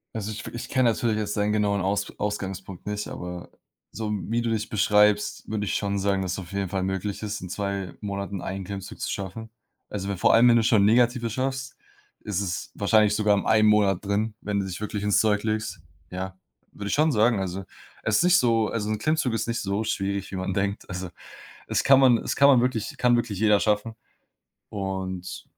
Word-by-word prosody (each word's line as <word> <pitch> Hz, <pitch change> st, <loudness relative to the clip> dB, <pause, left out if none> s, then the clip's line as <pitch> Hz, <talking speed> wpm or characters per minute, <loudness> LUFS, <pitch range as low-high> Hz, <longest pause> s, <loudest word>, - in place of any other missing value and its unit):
Also, 110 Hz, -1 st, -3 dB
ich 110 Hz, -, -7 dB
f -, -, -8 dB
ich 120 Hz, -, -6 dB
kenne 130 Hz, -3 st, +3 dB
natürlich 115 Hz, -1 st, 0 dB
jetzt 105 Hz, -1 st, -2 dB
deinen 105 Hz, +1 st, +1 dB
genauen 100 Hz, -2 st, +1 dB
Aus 95 Hz, +2 st, -1 dB
Ausgangspunkt 95 Hz, -2 st, -4 dB
nicht, 105 Hz, 0 st, -3 dB
aber 90 Hz, 0 st, -7 dB, 0.4 s
so 110 Hz, 0 st, -3 dB
wie 110 Hz, +3 st, -1 dB
du 120 Hz, -, -1 dB
dich 110 Hz, -1 st, -1 dB
beschreibst, 105 Hz, -1 st, +2 dB
würde 105 Hz, -1 st, -2 dB
ich -, -, -1 dB
schon 100 Hz, -1 st, -1 dB
sagen, 100 Hz, 0 st, +1 dB
dass 95 Hz, -1 st, -2 dB
auf 90 Hz, -2 st, -9 dB
jeden 100 Hz, -1 st, -2 dB
Fall 95 Hz, 0 st, -1 dB
möglich 95 Hz, +1 st, -3 dB
ist, 105 Hz, 0 st, -3 dB
in 90 Hz, -, -7 dB
2 100 Hz, -1 st, -3 dB
Monaten 100 Hz, -2 st, -4 dB
einen 95 Hz, +1 st, -5 dB
Klimmzug 100 Hz, 0 st, -7 dB
zu -, -, -3 dB
schaffen. 100 Hz, +3 st, -5 dB, 0.4 s
Also, 100 Hz, -1 st, -4 dB
wenn 100 Hz, -, -2 dB
vor -, -, +4 dB
allem, 115 Hz, +2 st, +7 dB
wenn 120 Hz, -, +6 dB
du 115 Hz, -, +3 dB
schon 110 Hz, -2 st, +4 dB
Negative 120 Hz, +2 st, +3 dB
schaffst, 130 Hz, +3 st, -3 dB, 0.4 s
ist 100 Hz, -2 st, -2 dB
es 90 Hz, -3 st, -4 dB
wahrscheinlich 105 Hz, 0 st, +3 dB
sogar 105 Hz, -1 st, +3 dB
im -, -, -2 dB
einen 110 Hz, -1 st, +4 dB
Monat 100 Hz, -3 st, +3 dB
drin, 105 Hz, +2 st, 0 dB
wenn 105 Hz, -1 st, -1 dB
du 100 Hz, -, -1 dB
dich 95 Hz, +1 st, -6 dB
wirklich 105 Hz, -1 st, -3 dB
ins 105 Hz, -1 st, +3 dB
Zeug 105 Hz, -2 st, +2 dB
legst. 110 Hz, -3 st, -2 dB, 0.3 s
Ja, 95 Hz, +1 st, -6 dB, 0.4 s
würde 100 Hz, -, -6 dB
ich -, -, 0 dB
schon 155 Hz, +2 st, +3 dB
sagen. 110 Hz, -1 st, +3 dB
Also, 95 Hz, 0 st, -3 dB, 0.4 s
es 110 Hz, -1 st, +2 dB
nicht 175 Hz, 0 st, +5 dB
so 115 Hz, -5 st, +3 dB
also, 105 Hz, -1 st, -3 dB
'n 110 Hz, -, 0 dB
Klimmzug 155 Hz, -1 st, 0 dB
ist 115 Hz, 0 st, -1 dB
nicht 115 Hz, 0 st, -1 dB
so 100 Hz, +2 st, -1 dB
schwierig, 100 Hz, -2 st, -2 dB
wie -, -, -5 dB
man 95 Hz, 0 st, -2 dB
denkt. 100 Hz, +1 st, -2 dB
Also, 95 Hz, 0 st, -5 dB, 0.6 s
es -, -, 0 dB
kann 135 Hz, 0 st, +6 dB
man 130 Hz, -3 st, +6 dB
es -, -, -3 dB
kann 140 Hz, -, +7 dB
man 135 Hz, -4 st, +6 dB
wirklich 120 Hz, -4 st, -1 dB
kann 125 Hz, -1 st, +4 dB
wirklich 115 Hz, -5 st, -2 dB
jeder 105 Hz, -1 st, +4 dB
schaffen. 105 Hz, +2 st, 0 dB, 0.8 s
Und 95 Hz, -2 st, -4 dB
105 Hz, 215 wpm, -25 LUFS, 95-110 Hz, 0.8 s, allem